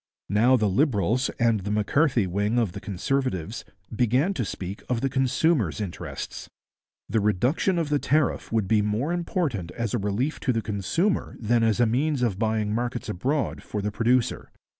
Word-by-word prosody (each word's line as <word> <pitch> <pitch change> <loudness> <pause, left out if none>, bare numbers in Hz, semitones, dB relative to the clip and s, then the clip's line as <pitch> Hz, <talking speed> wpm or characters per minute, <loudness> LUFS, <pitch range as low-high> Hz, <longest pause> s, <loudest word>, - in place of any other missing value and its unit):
Now 115 +6 +4
the 110 -3 +2
Liberals, 115 - +1
and 115 -2 +2
the 100 +1 -5
M'Carthy 115 +3 +2
wing 100 +5 0
of 115 -6 +1
the - - -7
Conservatives, 105 -1 -2 0.3
began 125 - +2
to 130 - -2
speak 95 -1 -5
of 120 -2 0
the 135 - +1
consumer's 130 - +1
interests. 100 -5 -6 0.6
The 110 +3 +1
reduction 120 - +1
of 165 -3 -1
the 145 -1 +2
tariff 150 0 0
would 110 -4 +1
be 105 +1 +3
more 110 +10 -1
important 160 - -2
as 115 -3 -3
a - - +1
relief 105 +9 -1
to 130 - 0
the 115 -1 -1
consumer 110 - -1
than 120 +1 +2
as 115 0 +2
a 120 - +5
means 135 +4 +1
of 100 -5 0
buying 110 -2 0
markets 120 0 -2
abroad 130 +9 -1
for 105 - -5
the 105 +1 -2
producer. 120 +3 +1
115 Hz, 175 wpm, -25 LUFS, 105-135 Hz, 0.6 s, a